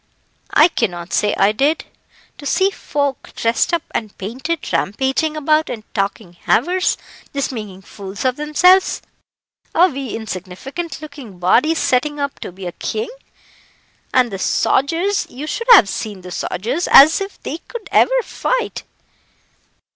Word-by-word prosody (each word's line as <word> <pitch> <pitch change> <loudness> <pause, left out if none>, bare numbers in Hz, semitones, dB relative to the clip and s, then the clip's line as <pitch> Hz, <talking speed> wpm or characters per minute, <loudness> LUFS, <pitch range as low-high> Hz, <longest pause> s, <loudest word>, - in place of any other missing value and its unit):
"I 305 - +6
cannot 180 - -3
say 210 - +2
I 195 +1 +4
did. 280 +8 +1 0.5
To 285 - -6
see 385 +7 +2
folk 285 -7 -3
dressed 230 0 +1
up 340 -2 0
and 215 -3 -4
painted, 260 - -4
rampaging 270 - 0
about 305 +1 +2
and 220 -3 -5
talking 195 -2 -2
havers, 355 - +1 0.4
just 280 -1 -1
making 205 -6 -7
fools 200 +3 -8
of 255 -1 +2
themselves. 360 +6 +3 0.7
A 355 +2 +6
wee 270 -5 -5
insignificant 225 - -6
looking 280 -10 -10
body 240 - +3
setting 295 0 +1
up 280 0 -3
to - - -7
be 185 +1 -10
a 175 - -3
king! 440 - -4 1.0
and 250 -3 +3
the 195 - -5
sogers 335 - +1
you 270 +5 -7
should 465 +9 -4
have 310 - +8
seen 205 -1 -5
the 180 0 -10
sogers, 245 - -2
as 310 +7 +8
if 390 0 -6
they 315 - -4
could 455 +3 -9
ever - - +4
fight." - - -2
270 Hz, 145 wpm, -19 LUFS, 210-325 Hz, 1.0 s, have